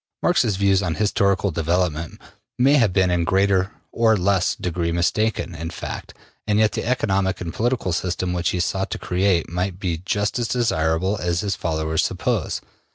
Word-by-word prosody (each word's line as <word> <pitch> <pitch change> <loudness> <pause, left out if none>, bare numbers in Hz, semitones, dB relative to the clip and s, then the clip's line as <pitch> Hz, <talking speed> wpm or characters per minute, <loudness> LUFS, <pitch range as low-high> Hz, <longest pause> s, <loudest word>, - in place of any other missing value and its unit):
Marx's 120 - +3
views 100 0 +3
on 85 -4 -1
historical 100 -2 +1
development 85 -1 -1 0.4
may 135 +3 +4
have 115 -9 +4
been 95 -1 +2
in 90 -1 +1
a - - +1
greater 95 +2 +2 0.2
or 115 -2 +3
less 95 0 +1
degree 85 -1 -2
mistaken 90 +3 0
in 80 0 -5
fact, - - -7 0.3
and 105 -1 +2
yet 110 -1 +4
the - - -3
economic 100 -6 0
and 85 -2 -5
political 120 -6 0
system 90 +1 -1
which 90 -1 0
he 90 - -1
sought 95 +2 -1
to - - -3
create 90 -2 +1
might 90 +2 -2
be 85 -4 -2
just 105 +4 -1
as 120 - 0
desirable 95 -5 0
as 85 0 0
his 100 -3 -1
followers 80 -2 -1
suppose. - - -1
95 Hz, 175 wpm, -22 LUFS, 85-105 Hz, 0.4 s, may